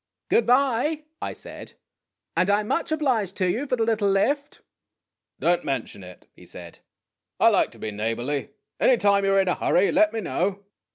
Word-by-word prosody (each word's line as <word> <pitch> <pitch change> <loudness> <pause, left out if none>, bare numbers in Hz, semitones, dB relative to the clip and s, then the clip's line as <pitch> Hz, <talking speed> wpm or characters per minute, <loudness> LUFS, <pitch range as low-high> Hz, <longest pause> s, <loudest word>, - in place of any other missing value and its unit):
'"Good 235 - +2
by," 275 +4 +2 0.2
I - - -4
said; - - -10 0.6
"and 185 - +2
I 205 +1 +3
'm 210 - -7
much 330 - -1
obliged 250 - 0
to 185 - 0
you 275 +9 -3
for 255 - +1
the 230 - 0
little 220 -3 +1
lift." 280 +9 0 0.4
" - - -60
Don't 175 0 +1
mention 125 -7 -4
it," 90 0 -14
he - - -17
said. 85 -1 -11 0.3
" - - -62
I - - +6
like - - +2
to - - -15
be 110 - -5
neighborly. 120 +7 -3 0.3
Any 255 - +4
time 200 -2 +3
you 195 - +2
're 195 - +4
in 190 - -2
a 180 - +2
hurry, 185 +3 +2
let 315 +2 +3
me 225 - -3
know." 195 +1 -2
200 Hz, 205 wpm, -24 LUFS, 175-250 Hz, 0.6 s, I